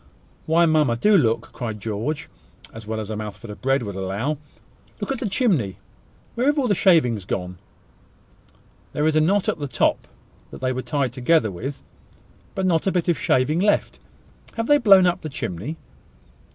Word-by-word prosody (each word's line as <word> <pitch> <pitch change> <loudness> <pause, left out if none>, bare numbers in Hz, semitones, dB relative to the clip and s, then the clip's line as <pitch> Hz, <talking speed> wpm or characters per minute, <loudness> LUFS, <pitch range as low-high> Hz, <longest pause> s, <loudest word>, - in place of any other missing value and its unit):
"Why, 165 +2 +4
mamma! 155 -7 +3
do 210 - +3
look!" 115 - +1
cried 110 -3 -5
George, 115 +9 -3 0.5
as 110 -2 -10
well 110 0 -3
as 110 0 -5
a - - -3
mouthful 105 +1 -7
of 105 - -11
bread 135 -1 +1
would 100 -2 -5
allow. 100 +10 -2 0.6
"Look - - -3
at 270 - -2
the 225 - -2
chimney! 160 - +1 0.6
Where 250 +4 +1
are - - +4
all 280 -4 0
the 205 - +3
shavings 155 - +3
gone? 90 -1 -4 1.3
There 150 - 0
is 160 - +3
the 155 - +3
knot 190 +5 +2
at - - -1
the 145 - -3
top 120 - 0 0.4
that - - -10
they 130 0 0
were 130 - -3
tied 135 -3 -1
together 130 -2 +2
with, 130 +10 -6 0.7
but 190 - -1
not 170 -1 +1
a - - +3
bit 180 -1 0
of 170 - +1
shaving 145 +6 +2
left. 205 +2 +1 0.6
Have 230 - -1
they 290 +4 +4
blown 195 -6 +7
up 175 -1 +1
the 155 - -5
chimney?" 115 - -5
145 Hz, 185 wpm, -23 LUFS, 110-175 Hz, 1.3 s, blown